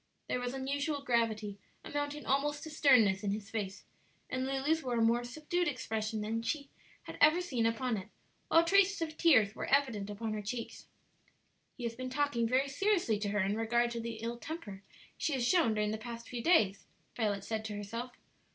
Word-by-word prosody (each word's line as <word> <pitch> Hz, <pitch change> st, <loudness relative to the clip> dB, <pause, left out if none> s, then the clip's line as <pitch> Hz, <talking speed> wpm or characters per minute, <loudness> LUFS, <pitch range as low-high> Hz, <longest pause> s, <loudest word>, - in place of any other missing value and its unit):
There -, -, -1 dB
was 245 Hz, +1 st, -3 dB
unusual 280 Hz, +2 st, -2 dB
gravity, 220 Hz, -5 st, 0 dB, 0.3 s
amounting 290 Hz, 0 st, -3 dB
almost 290 Hz, +2 st, 0 dB
to 315 Hz, -, -7 dB
sternness, 235 Hz, -10 st, +5 dB
in 205 Hz, -, 0 dB
his 205 Hz, +1 st, -4 dB
face, 200 Hz, -3 st, -4 dB, 0.5 s
and 255 Hz, +1 st, -1 dB
Lulu's 275 Hz, +4 st, +1 dB
wore 250 Hz, -4 st, -2 dB
a -, -, +2 dB
more 235 Hz, +2 st, +3 dB
subdued 310 Hz, +8 st, -2 dB
expression 220 Hz, -5 st, -2 dB
than 225 Hz, +2 st, -2 dB
she 280 Hz, +4 st, -3 dB, 0.3 s
had -, -, -9 dB
ever 310 Hz, +4 st, +7 dB
seen 255 Hz, -11 st, 0 dB
upon 230 Hz, 0 st, 0 dB
it, 190 Hz, +1 st, -7 dB, 0.4 s
while 330 Hz, -, +5 dB
traces 395 Hz, +1 st, +4 dB
of 310 Hz, -1 st, -5 dB
tears 250 Hz, -, +5 dB
were -, -, -5 dB
evident 235 Hz, -8 st, +1 dB
upon 215 Hz, +1 st, -3 dB
her 215 Hz, -, -3 dB
cheeks, 230 Hz, +3 st, -6 dB, 0.9 s
"He 250 Hz, -, -7 dB
has 230 Hz, -1 st, -2 dB
been 255 Hz, +2 st, -5 dB
talking 260 Hz, -4 st, +1 dB
very 260 Hz, +4 st, +2 dB
seriously 315 Hz, -, +1 dB
to 205 Hz, -1 st, -2 dB
her 210 Hz, 0 st, +1 dB
in 195 Hz, +2 st, +1 dB
regard 235 Hz, +2 st, +1 dB
to 235 Hz, -, -3 dB
the 230 Hz, 0 st, -4 dB
ill 235 Hz, +1 st, -3 dB
temper 235 Hz, -, -7 dB, 0.4 s
she 310 Hz, -, 0 dB
has 245 Hz, -3 st, +1 dB
shown 320 Hz, -11 st, +3 dB
during 210 Hz, 0 st, 0 dB
the 220 Hz, -, -3 dB
past 235 Hz, 0 st, -7 dB
few 245 Hz, -1 st, -4 dB
days," 215 Hz, -, +3 dB, 0.3 s
Violet 205 Hz, -4 st, 0 dB
said 220 Hz, 0 st, -3 dB
to 210 Hz, -1 st, -4 dB
herself. 230 Hz, +5 st, -5 dB
240 Hz, 195 wpm, -33 LUFS, 220-285 Hz, 0.9 s, ever